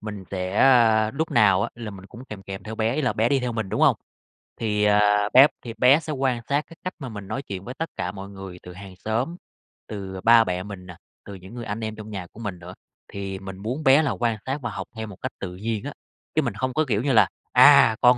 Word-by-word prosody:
Mình 105 -3 -7
sẽ, 95 0 -3
a, 115 -5 +5
lúc 160 +6 -3
nào 100 -4 +4
á - - -2
là 115 -3 -7
mình 95 -1 -11
cũng 120 +5 -12
kèm 105 -6 -9
kèm 95 -1 -8
theo 110 - -7
bé, 110 +2 0
ý 155 - -1
là 125 - +1
bé 115 +2 +1
đi 140 -1 +2
theo 125 -1 -2
mình, 110 -3 -3
đúng - - -2
hông? - - +5 0.6
Thì, 105 -2 0
à, 105 0 +3
bé 130 +3 +9
thì 120 -3 -7
bé 130 +6 +6
sẽ 155 -1 -5
quan 130 -3 0
sát 140 +1 +2
cái 165 - -15
cách 185 - -4
mà 135 -4 -6
mình 105 -3 -8
nói 110 +7 -3
chuyện 100 -8 -7
với 125 - -7
tất 165 +4 -4
cả 90 - -3
mọi 100 0 -9
người, 95 -2 -9
từ 90 - -10
hàng 95 0 -11
xóm, 115 - -2 0.5
từ, 100 -3 -6
ờ, 95 - -7
ba 115 0 +7
mẹ 90 -3 -3
mình 95 -2 -9
nà, 90 -1 -11 0.3
từ 100 - -9
những 95 +4 -12
người 120 -1 -6
anh 105 +1 -4
em 110 0 -4
trong 110 0 -9
nhà 95 -4 -6
của 105 - -16
mình 100 -6 -5
nữa, 90 +1 -10 0.3
thì 95 -1 -6
mình 95 -1 -8
muốn 120 +10 -4
bé 135 +2 +6
là 145 -5 0
quan 115 +2 -1
sát 135 +2 -2
và 120 - -3
học 100 -2 -6
theo 110 0 -5
một 105 - -10
cách 130 - -3
tự 90 -2 -6
nhiên 110 +2 -3
á. 145 +1 -6 0.4
Chứ 155 - +4
mình 120 -7 -2
hông 130 +2 -2
có 155 +3 +1
kiểu 105 -4 +1
như 140 - +1
là 110 - +6 0.2
"À, 110 - +7
con 125 0 +6
110 Hz, 275 wpm, -24 LUFS, 95-125 Hz, 0.6 s, bé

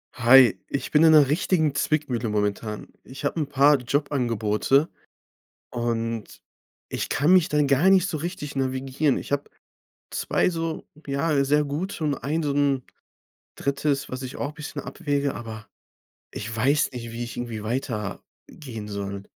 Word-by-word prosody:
Hi, 125 -3 +7
ich 140 - -4
bin 150 +1 +5
in 165 - +7
'ner 150 -3 +7
richtigen 155 0 +1
Zwickmühle 140 -5 0
momentan. 105 +1 -2 0.2
Ich 135 +3 -8
habe 155 - -1
'n 150 - -1
paar 145 0 +5
Jobangebote. 125 0 +1 0.8
Und 115 -2 -3 0.5
ich - - -3
kann 150 +6 +2
mich 185 -2 +5
da 150 -2 +1
gar 140 +6 +4
nicht 190 -2 +5
so 160 -6 -3
richtig 150 -3 -5
navigieren. 135 +1 0
Ich - - -7
habe 145 0 -1 0.6
2 - - +1
so 165 -2 -3 0.2
ja, 140 0 +1
sehr 150 +2 +3
gute, 155 +5 -4
und 145 -2 0
ein 150 +7 -2
so 145 -2 0
'n 140 -2 +1 0.8
3., 140 0 -1
was 130 0 -5
ich 130 -1 -7
auch 145 +1 -3
bisschen 150 -1 -7
abwäge, 145 -5 -2
aber 110 -2 -8 0.6
ich 110 +2 -6
weiß 140 +7 +2
nicht, 115 -2 -6
wie 120 +1 -4
ich 120 - -8
irgendwie 120 -3 -5
weiter, 110 -2 -3 0.2
gehen 115 -8 -8
soll. 100 -1 -5
140 Hz, 155 wpm, -25 LUFS, 120-150 Hz, 0.8 s, Hi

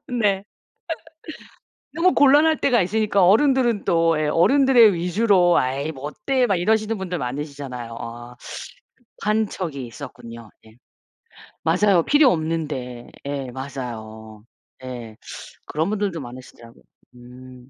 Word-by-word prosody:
네. 205 -5 0 1.5
너무 360 +2 +3
곤란할 295 +3 +5
때가 240 -7 +3
있으니까 200 0 +1
어른들은 240 0 +3
또 165 -1 +2
예 155 - 0
어른들의 240 - +5
위주로 180 0 +3
"에이 140 +5 -2
뭐 135 0 -11
어때." 250 - 0
막 195 - +1
이러시는 215 +3 0
분들 180 -2 -4
많으시잖아요. 130 -3 -6
아. 120 +1 -9 0.8
급한 215 +1 0
척이 140 -9 -5
있었군요. 115 -3 -10
네. 110 +1 -19 0.9
맞아요. 180 +1 +3
필요 290 - +5
없는데. 150 -7 -3 0.2
예 140 -2 -4
맞아요. 110 -5 -8 0.4
예. 120 -4 -8 0.5
그런 160 +4 -1
분들도 200 -6 -2
많으시더라고요. 120 -2 -12 0.3
음. 125 +1 -14
160 Hz, 270 characters per minute, -22 LUFS, 125-210 Hz, 1.5 s, 곤란할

